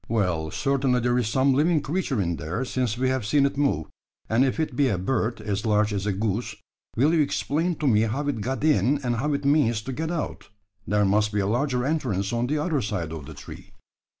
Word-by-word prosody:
"Well, 90 -8 0
certainly 135 - +1
there 120 +1 +1
is 120 - 0
some 130 +4 +2
living 155 +4 +3
creature 150 - -2
in 85 -3 -1
there, 85 - -3
since 125 -3 -1
we 130 +1 +1
have 130 -2 -1
seen 140 +7 +3
it 140 - -1
move; 135 - +1 0.4
and 115 +4 +3
if 135 +3 0
it 155 -5 -1
be 140 +1 +3
a 100 -7 0
bird 115 +4 -1
as 105 -1 -3
large 105 -1 +2
as 100 0 -2
a - - +2
goose, 105 +3 -2 0.4
will 145 +7 +3
you 165 - +4
explain 150 +4 0
to 150 - -4
me 110 -6 +4
how 140 +6 -2
it 135 -7 -1
got 130 +6 -3
in, 145 -2 +3
and 120 -2 0
how 145 +5 0
it 140 0 -2
means 120 -7 +2
to 130 - -5
get 160 +5 -3
out? 170 -3 -4 0.4
There 105 0 +2
must 105 +2 +2
be 105 - 0
a 100 - +1
larger 125 +3 0
entrance 120 - -1
on 120 +1 0
the 150 +3 0
other 150 -2 0
side 100 -7 -3
of 80 -3 -7
the 80 - -9
tree." - - -11
125 Hz, 230 wpm, -25 LUFS, 105-140 Hz, 0.4 s, you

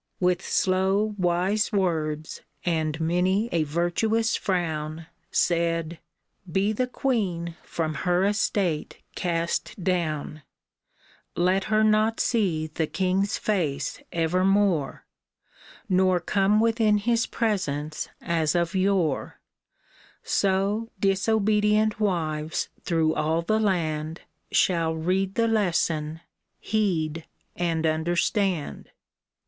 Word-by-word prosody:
With 180 0 +2
slow, 190 +3 +1
wise 180 +5 +1
words, 160 -6 -1 0.2
and 160 -3 0
many 180 +7 +1
a 170 - +1
virtuous 175 +9 0
frown, 160 -3 -2 0.2
Said, 170 -1 0 0.2
" 185 - -19
Be 195 +5 +1
the 250 +4 0
queen 190 -11 -1
from 160 -2 -3
her 180 +4 +1
estate 200 -5 0 0.2
cast 170 +1 -2
down! 155 -4 -1 0.9
Let 185 +2 +2
her 215 0 +2
not 215 +1 +3
see 185 -10 +1
the 155 0 -2
king's 190 +4 0
face 155 -10 -1
evermore, 180 -1 +1 0.8
Nor 185 -1 +3
come 200 +4 +2
within 225 -2 +3
his 230 +3 +1
presence 155 -10 -2
as 165 -1 0
of 170 +1 +1
yore; 185 -6 0 0.8
So 200 +4 0
disobedient 210 +2 +2
wives 160 -6 -1
through 160 -2 +1
all 160 +2 0
the 215 +5 +1
land 160 -6 -1 0.3
Shall 165 -3 +2
read 185 +4 -1
the 230 0 +2
lesson, 165 -7 0 0.4
heed 165 -7 -1 0.3
and 165 -2 -1
understand." 170 - 0
180 Hz, 100 wpm, -25 LUFS, 160-205 Hz, 0.9 s, not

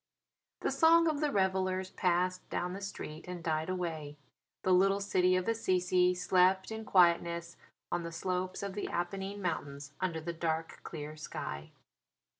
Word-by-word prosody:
The - - 0
song 330 +1 +5
of 305 -2 +1
the 300 -1 +1
revellers 190 -2 0
passed 180 +1 0
down 180 +1 -2
the 195 - -6
street 160 -6 -7
and 180 -2 -6
died 160 0 -1
away. 160 -5 -3 0.5
The 185 - +3
little 195 +2 +4
city 185 -2 +2
of 185 0 0
Assisi 180 -4 +2
slept 185 +2 +3
in 220 0 -5
quietness 170 -2 +3 0.4
on 175 - 0
the 170 0 -5
slopes 185 +2 -2
of 200 -1 -3
the 205 - -3
Apennine 195 +3 -3
Mountains 140 -5 -3
under 175 -3 -1
the 170 +2 -4
dark 160 -1 -2
clear 150 -1 -7
sky. 75 - -6
180 Hz, 155 wpm, -32 LUFS, 170-190 Hz, 0.5 s, song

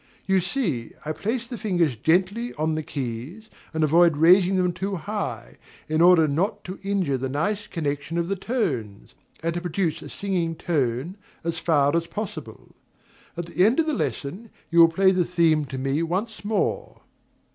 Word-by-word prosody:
You 190 0 +3
see 175 - -2
I 155 - -2
place 225 +8 -3
the 240 -3 -7
fingers 175 - +1
gently 190 - +1
upon 155 +1 -1
the 155 - -1
keys 145 - -6 0.2
and 160 -1 0
avoid 165 +1 +4
raising 180 +4 +5
them 180 -1 +1
too 195 +3 -3
high, 190 - -5 0.3
in 155 +1 +1
order 175 -2 +6
not 195 +8 -1
to 185 0 -7
injure 190 -9 0
the 130 +1 -2
nice 200 +10 -1
connection 150 0 -3
of 170 0 0
the 195 - -1
tones, 150 - -3 0.3
and 165 0 0
to 175 - -3
produce 170 -2 -1
a - - -9
singing 180 -5 -2
tone 150 - -1 0.3
as 165 0 -2
far 145 -3 +2
as 170 0 0
possible. 210 +4 -7 0.6
At 175 - -3
the 175 +2 +1
end 230 +9 +4
of 325 - +3
the 310 - 0
lesson 195 - -3 0.2
you 170 - +4
will 165 - +10
play 190 +3 +4
the 185 -1 +2
theme 165 -3 +2
to 135 -1 -6
me 135 +4 0
once 195 +8 -3
more.... 220 - -2
170 Hz, 180 wpm, -24 LUFS, 155-195 Hz, 0.6 s, will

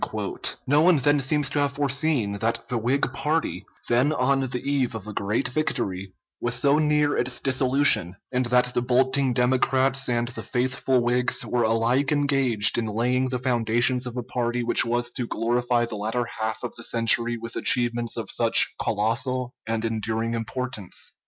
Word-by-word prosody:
No 145 +3 +3
one 175 0 +5
then 145 +2 +3
seems 140 +1 +1
to 145 - -1
have 140 -1 0
foreseen 140 -5 0
that 115 +1 -2
the 125 - -1
Whig 130 +5 0
party 155 +4 -2 0.2
then 125 +5 +2
on 135 -1 +1
the 125 -2 -2
eve 140 -4 0
of 110 -3 -7
a 105 - -7
great 100 +2 -1
victory 100 -9 -3 0.3
was 120 0 0
so 140 +4 +3
near 150 -1 +2
its 125 0 0
dissolution, 130 -8 +2 0.2
and 125 -1 0
that 125 0 +2
the - - 0
bolting 130 +2 +1
Democrats 130 +2 +1
and 120 0 0
the 125 - -7
faithful 130 0 0
Whigs 125 +1 +1
were 125 - -1
alike 115 +5 +1
engaged 135 -8 +3
in 115 - -2
laying 125 +4 0
the 125 - -2
foundations 125 0 +1
of 125 0 -7
a 125 - -3
party 120 0 -2
which 120 - +4
was 120 +1 -1
to 125 -3 -4
glorify 120 +1 0
the 115 -2 -6
latter 110 +4 -2
half 110 +1 -3
of 120 - -5
the 115 - -9
century 115 +1 +2
with 115 +1 -8
achievements 120 -1 +1
of - - -3
such - - +3
colossal 125 +4 -1
and 115 0 -2
enduring 110 +1 -2
importance. 115 -2 -5
125 Hz, 170 wpm, -24 LUFS, 115-135 Hz, 0.3 s, one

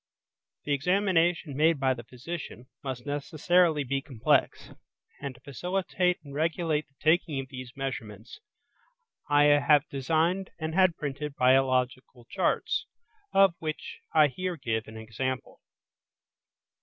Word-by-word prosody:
The 145 - -1
examination 175 -1 +1
made 155 +1 +3
by 130 -1 +2
the 120 -2 -9
physician 125 +2 -8 0.2
must 130 -3 -5
necessarily 155 +2 +2
be 135 +1 -1
complex, 130 -6 0 0.5
and 140 -2 -5
to 120 - -19
facilitate 180 +5 -1
and 140 -2 -11
regulate 160 0 0
the 140 - -38
taking 160 -2 +2
of 135 -1 -6
these 130 -2 -8
measurements 115 -5 -6 0.9
I 145 0 +5
have 145 0 +5
designed 165 +7 0
and 160 -1 -4
had 185 -2 +3
printed 145 0 -4
biological 130 -1 +1
charts, 190 - 0 0.4
of 195 -2 +5
which 155 -1 -5
I 155 -2 +6
here 180 +6 -4
give 115 -5 -2
an 110 0 -10
example. 115 +3 -4
145 Hz, 125 wpm, -28 LUFS, 130-165 Hz, 0.9 s, I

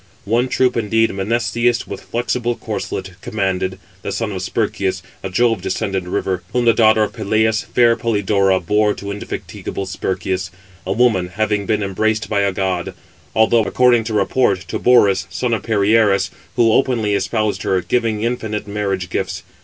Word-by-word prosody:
One 120 +5 +1
troop 125 -1 +1
indeed 115 0 +1
Menesthius, 115 +4 0
with - - -7
flexible 120 0 -2
corslet, 95 - -5
commanded, 95 -2 -2 0.2
the - - -4
son 110 -2 -2
of 95 -2 -4
Sperchius, 95 -2 -1 0.2
a 95 - -4
Jove 115 +1 +2
descended 95 -1 -2
river; 90 0 -1
whom 125 -1 +1
the 115 - +6
daughter 110 -1 +4
of 105 - -3
Peleus, 110 0 +1
fair 120 -1 +3
Polydora, 100 -4 +1
bore 105 +3 +2
to 100 0 -6
indefatigable 100 -1 -5
Sperchius, 95 -1 -3 0.4
a - - -1
woman 110 -5 +2
having 105 -1 0
been 105 -2 +1
embraced 110 +3 -1
by 105 - +1
a 100 0 +2
god; 95 -2 -2 0.4
although, 110 +1 +4
according 120 +1 +3
to 110 -1 -3
report, 100 -1 +2
to - - -2
Borus, 100 -7 +4
son 125 -2 -1
of 110 - 0
Perieres, 105 -1 +2 0.2
who 115 -2 +4
openly 115 -6 +1
espoused 105 +2 0
her, 95 - +1
giving 110 0 0
infinite 110 -3 -2
marriage 100 -3 -2
gifts. - - -3
105 Hz, 160 wpm, -19 LUFS, 95-115 Hz, 0.4 s, the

